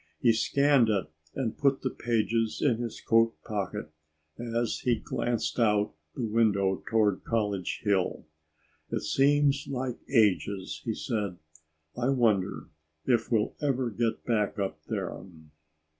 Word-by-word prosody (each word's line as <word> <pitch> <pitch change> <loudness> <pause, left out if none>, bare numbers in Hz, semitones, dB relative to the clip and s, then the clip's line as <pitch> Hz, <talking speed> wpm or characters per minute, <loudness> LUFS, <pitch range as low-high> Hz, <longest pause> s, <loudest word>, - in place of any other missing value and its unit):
He 115 -2 +4
scanned 140 +1 +3
it 95 -7 0 0.2
and 125 -5 -3
put 140 -1 +2
the 130 - 0
pages 115 -1 0
in 125 -6 +2
his 120 -2 -4
coat 115 0 +3
pocket 100 -8 -4 0.5
as 120 0 -1
he 125 -2 +2
glanced 120 +2 -2
out 105 -4 +2 0.2
the 120 - -2
window 105 -4 +2
toward 105 -3 +2
College 105 -5 -1
Hill. 100 -6 0 0.6
"It - - -2
seems 140 - +3
like 130 -2 -3
ages," 100 - +1
he 110 - -1
said. 105 -7 -2 0.6
"I 125 +2 0
wonder 110 -8 +1 0.4
if 120 -2 +1
we'll 110 -2 +2
ever 130 -4 0
get 115 +1 -1
back 105 -4 0
up 95 -6 -2
there." - - -4
115 Hz, 130 wpm, -28 LUFS, 105-125 Hz, 0.6 s, He